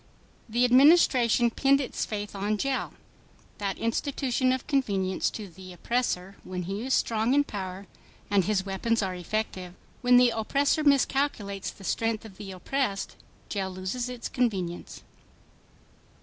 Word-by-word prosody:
The 240 +3 +3
Administration 250 -3 +5
pinned 275 +3 +3
its 265 - -2
faith 205 -1 -5
on 205 +2 -1
jail—that 210 -5 -5
institution 255 +2 0
of 260 0 -2
convenience 200 -10 0
to 210 -2 -7
the 185 +1 -12
oppressor 195 -2 -2
when 180 -1 -5
he 195 +5 -4
is 265 +1 +1
strong 225 +3 +1
in 290 - +5
power 190 -5 -6 0.4
and 200 -2 +3
his 200 -2 0
weapons 210 +3 0
are 190 -1 -2
effective. 180 -1 -4 0.3
When 245 0 +6
the 245 -1 +6
oppressor 275 +7 +1
miscalculates 270 -8 +1
the 195 - -12
strength 225 +3 -1
of 195 -4 -12
the 205 -2 -7
oppressed, 200 +2 -2 0.3
jail 195 -2 -2
loses 190 +7 -4
its 245 -2 -5
convenience. 190 -9 -2
220 Hz, 135 wpm, -27 LUFS, 195-250 Hz, 0.4 s, When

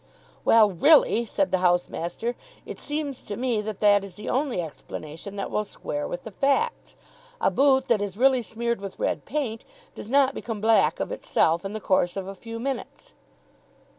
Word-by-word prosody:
"Well, 220 -3 +6
really," 235 - +4
said 290 +6 0
the 185 - +2
headmaster, 175 +4 0 0.3
"it - - -8
seems 295 -2 -3
to 205 - -6
me 240 -4 0
that 210 -1 -6
that 205 -1 +5
is 195 -3 -9
the 210 - -7
only 265 -5 0
explanation 160 +3 -7
that 200 - -4
will 210 - 0
square 145 -7 -5
with 175 - -5
the 220 - -8
facts. 355 - 0 0.4
A - - +2
boot 265 -1 +3
that 225 -4 +2
is 200 -1 -4
really 260 +1 +4
smeared 235 0 -3
with 195 -1 -7
red - - -2
paint 240 -5 -3 0.3
does 210 - -9
not 275 0 +4
become 225 -5 -5
black 205 -7 +3
of - - -3
itself 165 +2 +1
in 195 +1 -5
the 215 - -4
course 185 -2 +1
of 195 - -3
a 195 - -6
few 230 +3 -8
minutes." 275 - -5
220 Hz, 185 wpm, -25 LUFS, 195-260 Hz, 0.4 s, Well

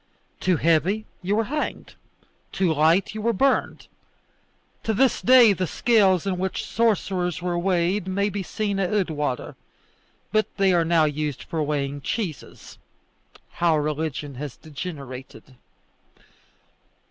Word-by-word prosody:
Too 185 -2 +1
heavy, 170 +8 +2 0.2
you 195 +3 0
were 225 - +2
hanged; 300 +7 -4 0.6
too 185 -4 +1
light, 165 +7 +3
you 215 - -5
were 230 +2 +1
burned. 270 +7 +1 1.0
To 220 - -1
this 260 +1 +2
day 245 -4 +7
the 185 -1 -2
scales 195 -4 +3
in 185 -2 -1
which 190 0 -2
sorcerers 190 -6 0
were 175 0 -2
weighed 180 +1 0
may 200 +2 0
be 200 - -3
seen 200 +1 -2
at 185 -2 0
Oudewater, 155 -10 -1 0.8
but 215 0 +2
they 195 -2 +3
are 170 -1 +3
now 165 -1 +3
used 150 -2 -3
for 160 - -3
weighing 145 -1 -2
cheeses; 170 - -5 0.8
how 170 -2 +3
religion 150 -1 -3
has 145 -4 -6
degenerated! 140 -5 -9
180 Hz, 130 wpm, -24 LUFS, 155-205 Hz, 1.0 s, day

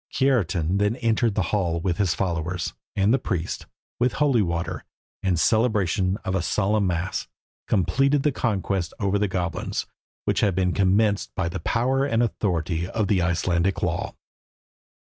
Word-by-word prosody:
Kiartan 100 - +1
then 105 +2 +2
entered 115 -2 +1
the 105 - +2
hall 85 -5 +1
with 85 0 -1
his 95 -5 +1
followers, 90 -1 -2 0.2
and 100 +3 +3
the 135 - +3
priest, 90 -8 -3 0.3
with 120 -1 +2
holy 135 -3 +3
water, 85 -2 -2 0.4
and 90 -4 +1
celebration 100 -1 +2
of 95 - -1
a 95 - +1
solemn 105 +2 +1
mass, 90 +1 -2 0.4
completed 135 +8 +2
the 150 - +3
conquest 100 -7 -1
over 100 -1 +1
the 105 - +2
goblins, 90 -3 -2 0.4
which - - +1
had 100 -4 +2
been 90 -1 +1
commenced 100 +1 +2
by 95 -2 0
the 85 - -4
power 130 +9 +1
and 120 -4 +2
authority 85 -6 -1
of 105 0 -1
the 95 -4 +3
Icelandic 90 +2 0
law. 85 -2 -2
95 Hz, 155 wpm, -24 LUFS, 90-110 Hz, 0.4 s, and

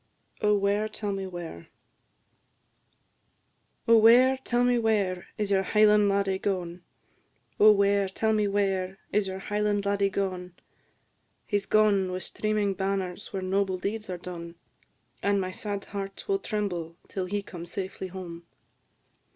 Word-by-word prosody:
OH, 210 0 +4
WHERE, 200 +2 +1
TELL 205 -2 -4
ME 195 -1 -3
WHERE? 170 - -8 2.2
"Oh, 230 0 +7
where, 245 +4 +7
tell 245 -2 0
me 245 -1 +3
where, 200 -5 0
is 210 -1 -2
your 195 -1 +4
Highland 210 +1 +4
laddie 195 -1 +1
gone? 180 -3 -3 0.8
Oh, 215 +1 +9
where, 200 -1 +3
tell 220 +3 0
me 210 -1 +2
where, 195 -2 0
is 205 -1 +1
your 190 0 -4
Highland 205 +1 -1
laddie 200 0 +2
gone?" 185 -2 -3 0.9
"He 205 - +1
's 195 - -9
gone, 205 -3 +3
with 185 0 -4
streaming 215 -2 -1
banners, 190 0 -3
where 190 -1 -4
noble 190 0 0
deeds 210 +3 -4
are 180 - -3
done, 170 -1 -8 0.7
And 200 0 +2
my 185 -1 -2
sad 200 +1 -5
heart 195 -1 -6
will 395 -1 +1
tremble 180 - -3
till 190 -2 -3
he 205 +2 -2
come 175 -3 -9
safely 190 +1 -5
home. 175 -2 -9
200 Hz, 145 wpm, -27 LUFS, 185-210 Hz, 2.2 s, Oh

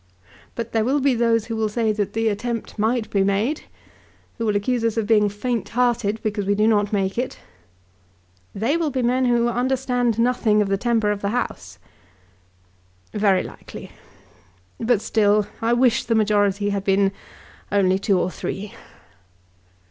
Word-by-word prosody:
But 235 -1 -5
there 225 -1 +1
will 270 +5 +1
be 275 -1 +2
those 230 -2 +1
who 230 - -4
will 220 -1 0
say 220 0 0
that 210 -2 -2
the 225 0 0
attempt 225 +1 -3
might 225 +1 +1
be 195 -1 +2
made, 205 +10 0 0.7
who 230 - -1
will 210 - +1
accuse 230 +4 0
us 230 -1 0
of 225 - 0
being 210 -1 +3
faint 230 +4 -3
hearted 240 -3 0
because 210 -1 -1
we 205 - +2
do 210 +1 +2
not 205 -2 +2
make 195 +1 -1
it." 250 - -3 1.2
"They 235 +11 +1
will 330 -3 0
be 260 -2 -2
men 255 +2 +2
who 240 -1 +2
understand 245 -1 0
nothing 230 -3 +2
of 205 -2 +1
the 195 - +2
temper 225 -1 +1
of 205 -1 -3
the 200 - -1
House." 245 +3 -4 1.4
"Very 200 -3 +2
likely. - - -10 0.9
But 230 -2 +1
still, 210 -1 +2 0.2
I 230 +1 +2
wish 240 -1 +3
the 230 - +1
majority 205 -1 +2
had 200 0 -2 0.8
only 195 -2 +3
been - - -8
two 195 -1 +1
or 180 - -1
three. 195 +2 -5
220 Hz, 165 wpm, -22 LUFS, 205-240 Hz, 1.4 s, being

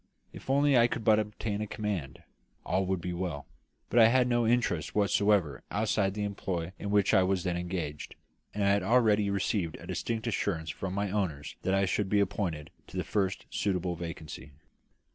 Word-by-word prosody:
If - - -11
only 140 +1 +4
I 120 -1 +6
could 120 -1 -4
but 110 -1 +5
obtain 105 0 -3
a 105 - -2
command, 100 -11 -4 0.4
all 95 0 0
would 95 -2 -1
be 90 +1 -3
well; 85 -5 -4 0.5
but 120 - +4
I 110 - +9
had 125 +1 +3
no 120 -2 +2
interest 115 -9 0
whatever 100 -6 +2
outside 105 -2 0
the 105 - -2
employ 95 -4 -3
in 100 - -4
which 100 0 +3
I 95 - +6
was 95 -1 +1
then 90 -2 -1
engaged; 85 -4 -4 0.4
and 105 - -2
I 100 - +4
had 100 0 +3
already 105 -1 +3
received 100 -3 -1
a - - -11
distinct 115 -1 -3
assurance 90 -8 -1
from 95 0 -5
my 100 -1 -1
owners 90 -9 -2
that 95 - +1
I 95 0 +3
should 95 +1 -1
be 105 - +3
appointed 95 -6 -2 0.2
to - - -8
the - - 0
first 100 -2 -1
suitable 90 -3 -1
vacancy. 80 -4 -8
100 Hz, 190 wpm, -30 LUFS, 90-105 Hz, 0.5 s, I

